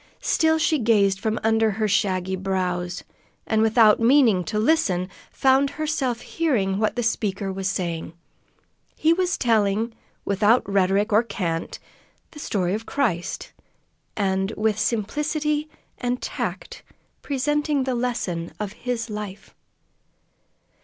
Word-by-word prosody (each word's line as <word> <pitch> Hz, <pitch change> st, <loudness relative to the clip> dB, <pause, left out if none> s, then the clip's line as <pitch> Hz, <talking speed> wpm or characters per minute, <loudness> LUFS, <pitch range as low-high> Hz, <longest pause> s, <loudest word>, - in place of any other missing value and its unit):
Still 320 Hz, 0 st, +3 dB
she 315 Hz, -1 st, +2 dB
gazed 205 Hz, -4 st, +3 dB
from 220 Hz, +2 st, -1 dB
under 225 Hz, 0 st, +3 dB
her 215 Hz, +1 st, -1 dB
shaggy 190 Hz, -2 st, 0 dB
brows, 180 Hz, -2 st, -2 dB, 0.4 s
and, 220 Hz, 0 st, +1 dB
without 220 Hz, -1 st, +5 dB
meaning 230 Hz, -6 st, +4 dB
to 215 Hz, -1 st, -3 dB
listen, 210 Hz, -, +2 dB, 0.2 s
found 270 Hz, +1 st, +3 dB
herself 285 Hz, -5 st, -2 dB
hearing 210 Hz, -13 st, 0 dB
what 215 Hz, -1 st, 0 dB
the 240 Hz, -, -1 dB
speaker 200 Hz, -3 st, -1 dB
was 190 Hz, 0 st, -2 dB
saying. 170 Hz, -4 st, -3 dB, 0.8 s
He 320 Hz, +1 st, +3 dB
was 360 Hz, 0 st, 0 dB
telling 220 Hz, -1 st, +1 dB, 0.3 s
without 210 Hz, +4 st, +3 dB
rhetoric 200 Hz, +2 st, +2 dB
or 215 Hz, -, +6 dB
cant 170 Hz, -8 st, -3 dB, 0.5 s
the 300 Hz, -, -11 dB
story 185 Hz, -9 st, -1 dB
of 220 Hz, +2 st, -4 dB
Christ, 210 Hz, -12 st, -2 dB, 0.6 s
and 195 Hz, -1 st, 0 dB
with 215 Hz, -1 st, +1 dB
simplicity 300 Hz, +7 st, -1 dB, 0.3 s
and 245 Hz, 0 st, -1 dB
tact -, -, -5 dB, 0.4 s
presenting 295 Hz, +1 st, 0 dB
the 260 Hz, 0 st, -1 dB
lesson 230 Hz, -9 st, -2 dB
of 210 Hz, -1 st, -4 dB
His 245 Hz, -2 st, -3 dB
life. 210 Hz, -2 st, -7 dB
220 Hz, 125 wpm, -23 LUFS, 195-260 Hz, 0.8 s, or